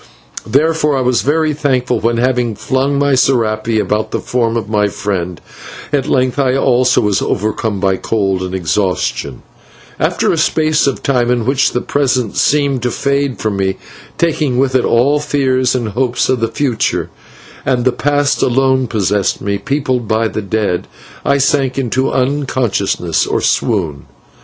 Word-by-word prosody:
Therefore 150 0 +2
I - - 0
was 125 -1 +2
very 155 +2 +1
thankful 130 -4 0
when, 115 +1 0
having 120 -2 0
flung 135 +6 0
my 140 0 +2
/serape/ 115 -4 +1
about 105 0 -1
the - - -2
form 115 -2 -1
of 115 - -3
my 105 -1 +1
friend, 90 -5 -3 0.5
at 140 -1 +1
length 130 0 +1
I 130 -2 +2
also 125 -1 +3
was 105 -1 +1
overcome 110 0 -1
by 95 -1 +1
cold 95 -4 -1
and 95 0 -4
exhaustion, 95 +1 -2 0.6
and - - +2
after - - 0
a - - 0
space 155 -2 +2
of 135 - -2
time, 125 -3 +1
in 120 -2 +1
which 135 +2 +1
the 125 - 0
present 130 -5 0
seemed 140 -3 +1
to 125 - 0
fade 140 0 -1
from 105 -3 -2
me, 95 -1 -1 0.4
taking 155 -6 0
with 130 0 +1
it 130 - +2
all 135 +6 +3
fears 130 -4 +1
and 120 -4 -2
hopes 120 +3 0
of 130 - +1
the 115 - +1
future, 120 -1 -1 0.5
and 125 -2 0
the 130 - +4
past 145 +3 0
alone 130 0 +2
possessed 100 -3 0
me, 100 0 -2
peopled 130 -1 -1
by 110 +1 +1
the 110 - -4
dead, 100 -3 -1 0.4
I 140 - +2
sank 135 -1 +1
into 130 0 0
unconsciousness 125 - 0
or - - 0
swoon. 85 - -1
125 Hz, 165 wpm, -15 LUFS, 110-135 Hz, 0.6 s, the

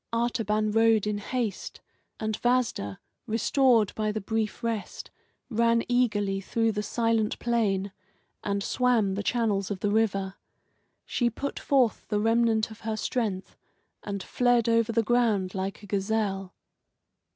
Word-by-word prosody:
Artaban 220 -2 0
rode 225 -1 +4
in 210 -1 -1
haste, 220 -2 -3 0.4
and 220 0 -1
Vasda, 240 - 0 0.3
restored 230 0 +3
by 215 -1 -1
the 215 - -3
brief 220 +3 -2
rest, 230 -3 -4 0.4
ran 230 0 +2
eagerly 205 -6 +1
through 225 +3 0
the 210 -1 -2
silent 225 0 0
plain 205 -5 0 0.5
and 200 0 -1
swam 235 -6 +2
the 200 - -2
channels 210 -3 0
of 200 -3 -4
the 205 - +1
river. 195 -3 0 0.7
She 240 -2 +1
put 280 +5 -5
forth 260 -5 +1
the 210 -2 0
remnant 225 0 +2
of 220 - -11
her 220 -1 -3
strength, 210 -5 -2 0.5
and 200 -2 -5
fled 245 -2 +2
over 230 -1 +3
the 230 0 +2
ground 220 -6 +1
like 195 +2 -4
a - - -8
gazelle. 195 -1 -1
220 Hz, 140 wpm, -27 LUFS, 205-230 Hz, 0.7 s, rode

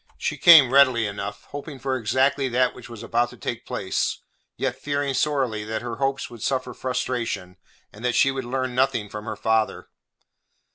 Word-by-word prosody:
She - - -2
came 155 -8 +8
readily 130 -5 +5
enough, 100 0 -5
hoping 145 0 -7
for 130 0 -2
exactly 130 +4 +1
that 125 +1 +2
which 125 -1 -12
was 115 -3 -9
about 120 +1 +1
to - - -13
take - - -5
place, - - -2 0.4
yet 125 - -1
fearing 140 +1 -2
sorely 130 -6 0
that 110 +1 -4
her 120 -1 -5
hopes 135 +1 -1
would 120 -2 -12
suffer 130 0 -1
frustration, 120 -8 -3 0.4
and 105 - -13
that 125 -1 0
she 135 - +4
would 135 -1 -4
learn 130 0 -2
nothing 125 -5 +1
from 105 +1 -7
her 110 - -4
father. 110 0 0
125 Hz, 180 wpm, -24 LUFS, 110-135 Hz, 0.4 s, came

